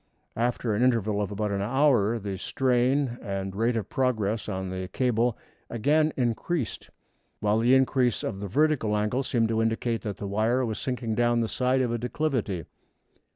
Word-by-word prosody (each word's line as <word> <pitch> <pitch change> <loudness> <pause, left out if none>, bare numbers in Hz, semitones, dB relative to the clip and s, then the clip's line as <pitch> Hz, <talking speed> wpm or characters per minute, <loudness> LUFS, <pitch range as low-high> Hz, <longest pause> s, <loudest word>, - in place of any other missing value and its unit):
After 120 -1 0
an 105 - 0
interval 110 -5 +2
of 100 - -2
about 105 0 -2
an 100 -1 -1
hour 120 -2 +3
the 100 -3 -4
strain 130 +2 +1
and 95 -2 -4
rate 115 +3 +1
of 105 -3 -3
progress 110 -5 -1
of 95 -2 -3
the 95 0 -4
cable 120 -1 +1 0.3
again 150 +7 +2
increased, 125 +3 -2 0.5
while 105 +1 +2
the 120 +3 +5
increase 130 -2 +2
of 95 - -3
the 100 - -4
vertical 135 -3 +2
angle 105 +5 0
seemed 115 -4 0
to 110 0 +1
indicate 115 +1 0
that 105 -3 -5
the - - -6
wire 110 +6 +1
was 110 -2 -3
sinking 125 -3 -2
down 120 +1 +2
the 115 - 0
side 130 +3 +1
of 125 -2 0
a 120 - -1
declivity. 120 - -2
115 Hz, 175 wpm, -27 LUFS, 105-125 Hz, 0.5 s, the